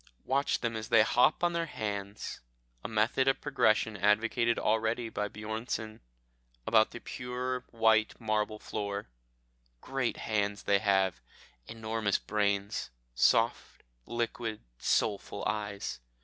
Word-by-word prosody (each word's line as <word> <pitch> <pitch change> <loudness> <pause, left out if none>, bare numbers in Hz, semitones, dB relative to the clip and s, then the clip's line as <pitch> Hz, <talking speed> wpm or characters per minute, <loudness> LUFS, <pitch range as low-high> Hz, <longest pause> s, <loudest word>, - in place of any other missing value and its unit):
Watch 140 +2 +1
them 115 -1 -1
as 110 0 -4
they 115 -2 +7
hop 125 +9 +3
on 175 0 +3
their 170 -1 -1
hands 100 -5 -4 0.4
a - - -3
method 115 +4 +2
of 135 0 +3
progression 110 -6 +2
advocated 115 +4 +2
already 110 +2 +1
by 105 -1 -2
Bjornsen 110 +1 -4 0.7
about 110 -1 +5
the 120 - -8
pure 125 +1 -4
white 110 -1 +3
marble 110 -1 0
floor. 100 - -4 0.7
Great 130 - -2
hands 105 -1 -1
they 100 -1 +3
have, 95 - +2 0.5
enormous 110 -2 -1
brains, 100 -1 -1 0.2
soft, - - +2 0.2
liquid, 115 -2 -3 0.2
soulful 100 -1 0
eyes. 100 0 -3
110 Hz, 120 wpm, -31 LUFS, 105-120 Hz, 0.7 s, they